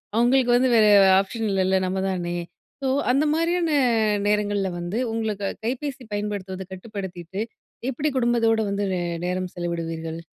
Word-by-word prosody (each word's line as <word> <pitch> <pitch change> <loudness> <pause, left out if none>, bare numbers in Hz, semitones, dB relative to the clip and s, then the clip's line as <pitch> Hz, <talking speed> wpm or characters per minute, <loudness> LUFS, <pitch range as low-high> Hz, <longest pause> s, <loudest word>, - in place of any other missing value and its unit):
அவங்களுக்கு 245 +2 +3
வந்து 260 +1 +3
வேற 215 - +6 0.4
ஆப்ஷன் 225 +3 -4
இல்லல 190 0 +2
நம்ம 190 +1 -1
தானே. 175 -1 -2 0.4
ஸோ, 270 - -1 0.2
அந்த 275 +4 +2
மாரியான 335 +1 +1 0.6
நேரங்கள்ல 205 -1 +1
வந்து 175 +5 -3
உங்களுக்கு 220 -3 -2 0.2
கைபேசி 260 +2 -3
பயன்படுத்துவத 200 -2 -4
கட்டுப்படுத்திட்டு, 190 -2 -6 0.5
எப்டி 300 +4 -1
குடும்பத்தோடு 230 -2 +2
வந்து 200 +1 -1
நே 180 - -1 0.2
நேரம் 180 0 -2
செலவிடுவீர்கள்? 165 -2 -4
205 Hz, 130 wpm, -24 LUFS, 185-240 Hz, 0.6 s, வேற